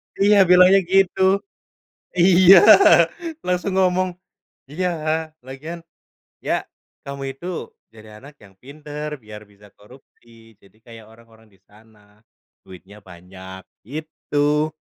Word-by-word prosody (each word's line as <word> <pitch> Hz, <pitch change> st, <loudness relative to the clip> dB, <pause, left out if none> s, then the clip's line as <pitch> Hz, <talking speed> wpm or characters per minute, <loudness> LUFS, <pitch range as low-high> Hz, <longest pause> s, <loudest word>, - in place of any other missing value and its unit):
Iya 205 Hz, +1 st, +3 dB
bilangnya 180 Hz, +2 st, +6 dB
gitu, 190 Hz, 0 st, +1 dB, 1.0 s
iya 185 Hz, +1 st, +6 dB, 0.9 s
langsung 180 Hz, +2 st, -2 dB
ngomong, 185 Hz, 0 st, +1 dB, 0.6 s
iya 180 Hz, +5 st, -3 dB, 0.6 s
lagian, 155 Hz, +6 st, -9 dB, 0.7 s
ya -, -, 0 dB, 0.5 s
kamu 140 Hz, 0 st, -8 dB
itu 155 Hz, +6 st, -12 dB, 0.5 s
jadi 110 Hz, -1 st, -16 dB
anak 145 Hz, +2 st, -15 dB
yang 95 Hz, -, -20 dB
pinter 150 Hz, +2 st, -9 dB
biar 105 Hz, 0 st, -12 dB
bisa 100 Hz, 0 st, -20 dB
korupsi 115 Hz, -1 st, -21 dB
jadi 100 Hz, -, -24 dB
kayak 115 Hz, -2 st, -14 dB
orang-orang 115 Hz, 0 st, -21 dB
disana, 105 Hz, +1 st, -25 dB, 0.4 s
duitnya 95 Hz, +3 st, -16 dB
banyak 95 Hz, +2 st, -13 dB, 0.3 s
gitu, 150 Hz, 0 st, -2 dB
135 Hz, 100 wpm, -20 LUFS, 105-175 Hz, 1.0 s, bilangnya